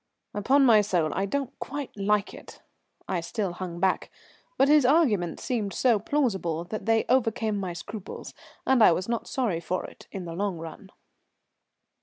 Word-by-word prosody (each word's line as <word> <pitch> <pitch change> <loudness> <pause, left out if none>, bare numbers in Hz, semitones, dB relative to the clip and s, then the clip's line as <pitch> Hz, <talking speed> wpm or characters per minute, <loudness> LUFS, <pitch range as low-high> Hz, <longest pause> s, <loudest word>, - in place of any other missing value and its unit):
"Upon 265 +7 +3
my 220 -4 +7
soul, 175 -6 0
I 195 - -1
don't 275 +3 -2
quite 285 0 -5
like 210 0 +1
it." - - -12 0.5
I 185 -3 -1
still 190 +3 -2
hung 175 -1 -6
back, 190 0 +1 0.5
but 270 - +5
his 300 0 +6
arguments 245 - +2
seemed 210 -7 -2
so 240 -5 +3
plausible 190 - 0
that 215 +5 -6
they 225 0 +3
overcame 225 -4 +1
my 185 -3 -3
scruples, 205 +3 -8 0.3
and 265 -2 +4
I 175 - +7
was 185 +3 -3
not 235 -1 -2
sorry 225 -11 -1
for 185 +2 -3
it - - -13
in 190 -2 -6
the 165 - -6
long 195 0 -2
run. 165 +5 -9
205 Hz, 170 wpm, -27 LUFS, 180-245 Hz, 0.5 s, my